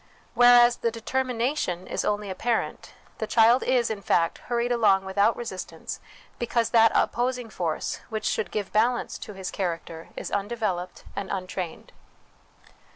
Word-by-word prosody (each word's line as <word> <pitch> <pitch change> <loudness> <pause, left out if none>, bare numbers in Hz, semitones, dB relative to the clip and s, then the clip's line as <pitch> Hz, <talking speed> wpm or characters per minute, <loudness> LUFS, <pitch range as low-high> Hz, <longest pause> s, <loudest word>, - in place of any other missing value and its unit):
Whereas 245 0 +7
the 230 - 0
determination 235 - -1
is - - -3
only 205 -1 -1
apparent; 225 +5 -2 0.2
the 220 - -2
child 230 +3 +5
is, 245 -3 +2
in 210 -2 -4
fact, 170 -2 +1
hurried 240 0 -1
along 210 -5 +3
without 200 +4 +2
resistance, 215 -6 -6 0.4
because 235 -1 0
that 225 -1 +6
oppos 250 +1 +1
ing 235 -3 -8
force 165 -5 -2
which 220 -2 -4
should 190 - 0
give 205 -3 -4
balance 240 +3 +1
to 210 - -8
his 190 -1 -5
character 170 -3 -4
is - - -6
undeveloped 200 -4 -2
and 200 -1 -4
untrained. 185 -3 -5
220 Hz, 145 wpm, -26 LUFS, 190-240 Hz, 0.4 s, Whereas